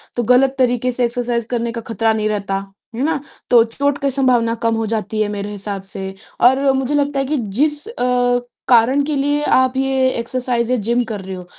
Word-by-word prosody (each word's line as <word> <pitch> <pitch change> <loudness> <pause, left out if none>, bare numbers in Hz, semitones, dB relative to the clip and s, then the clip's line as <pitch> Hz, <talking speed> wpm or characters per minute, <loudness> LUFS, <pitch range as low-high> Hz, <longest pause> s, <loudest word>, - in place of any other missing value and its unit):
तो 240 - 0
गलत 255 +3 +3
तरीके 250 0 +2
से 245 0 0
एक्सरसाइज़ 235 -1 -2
करने 235 -1 -1
का 230 0 -5
खतरा 225 0 0
नहीं 215 0 -1
रहता, 200 -2 -2 0.4
है 255 - -2
ना? 310 -1 0 0.3
तो 235 -2 +7
चोट 280 +5 -1
की 275 - +1
संभावना 245 -4 +2
कम 230 - +1
हो 225 0 -1
जाती 215 +1 -2
है 215 - +1
मेरे 200 +1 -4
हिसाब 200 -1 -5
से 190 0 -5 0.3
और 270 +2 +3
मुझे 265 +2 -1
लगता 285 -1 0
है 270 - 0
कि 295 +2 -1
जिस 290 - -1
अ, 245 - +1 0.3
कारण 250 +3 +4
के 295 0 -2
लिए 290 +2 +1
आप 260 -2 +2
ये 265 -1 +2
एक्सरसाइज़ 240 0 -1
या - - +3
जिम 240 +1 +2
कर 215 -4 -5
रहे 190 0 -7
हो 180 -1 -9
245 Hz, 210 wpm, -18 LUFS, 225-270 Hz, 0.4 s, तो